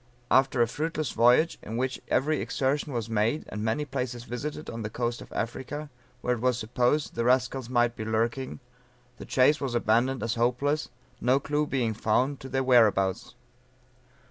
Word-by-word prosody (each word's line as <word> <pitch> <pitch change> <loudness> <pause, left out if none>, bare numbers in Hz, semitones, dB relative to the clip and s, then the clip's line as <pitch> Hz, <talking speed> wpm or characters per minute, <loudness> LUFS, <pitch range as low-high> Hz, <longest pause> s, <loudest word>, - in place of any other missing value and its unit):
After 130 -2 +4
a - - 0
fruitless 155 +1 -2
voyage 125 +8 +4
in 110 +2 -5
which 130 +1 -2
every 150 +2 +1
exertion 140 +2 -1
was 115 -4 -3
made, 115 +6 0
and 105 - -5
many 115 +7 0
places 125 -3 -4
visited 145 +6 -5
on 115 0 -5
the 105 - -3
coast 120 +1 -2
of - - -12
Africa, 140 +6 -4 0.3
where 125 - +1
it 120 - -3
was 125 -1 +2
supposed 125 +6 0
the 115 - -1
rascals 125 0 +1
might 120 -1 +2
be 110 - -5
lurking, 115 +4 -1 0.6
the - - -9
chase 135 +4 +3
was 130 -4 -2
abandoned 120 +3 +2
as 115 -1 0
hopeless, 125 +6 0 0.3
no 130 +3 +3
clue 150 +1 -1
being 120 -6 0
found 125 +6 +1
to 135 - -9
their 135 0 0
"whereabouts." 110 -6 +3
125 Hz, 170 wpm, -27 LUFS, 115-135 Hz, 0.6 s, After